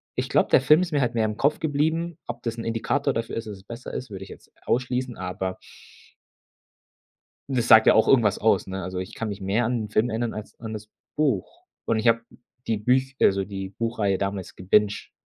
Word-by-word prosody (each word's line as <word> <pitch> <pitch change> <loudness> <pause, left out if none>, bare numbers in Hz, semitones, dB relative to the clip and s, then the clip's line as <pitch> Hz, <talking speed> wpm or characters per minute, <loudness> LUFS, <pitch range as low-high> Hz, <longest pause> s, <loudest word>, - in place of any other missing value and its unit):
ich - - -2
glaube, - - +3
der - - +5
Film 150 +5 +5
ist 175 -3 -3
mir 145 - +2
halt 120 -2 0
mehr 110 -1 +2
im 105 -1 -2
Kopf 145 +6 +1
geblieben.“ 160 +2 0
Ob 120 0 -6
das 115 -1 -3
'n 115 - -4
Indikator 115 +5 0
dafür 115 -1 -3
ist, 115 - -4
dass 105 -2 -7
es 95 - -17
besser 115 +4 -8
ist, 130 - -5
würde 95 -2 -7
ich 95 - -12
jetzt - - -14
ausschließen, 125 0 -1
aber 95 0 -4 1.9
das 125 -3 0
sagt 110 0 +8
ja - - +8
auch 110 - +4
irgendwas 115 -7 +4
aus, 105 -4 +2
ne? 95 0 -4
Also 90 0 -4
ich 95 - -7
kann 115 - -3
mich 100 -1 -5
mehr 100 +5 0
an 120 -1 -1
'n - - -11
Film 110 +3 +2
ändern 115 +1 -2
als 110 0 -9
an 110 -1 -6
das 105 0 -8 0.3
Buch. 135 -11 -1 0.2
Und 115 - +1
ich 110 +2 0
hab 115 0 +2 0.5
die 110 - +1
Büch 130 +5 +1
also 95 0 +4
die 95 -1 -6
Buchreihe 105 -2 -1
damals 100 -1 -4
gebinged, 105 +3 +1
115 Hz, 220 wpm, -25 LUFS, 100-125 Hz, 1.9 s, sagt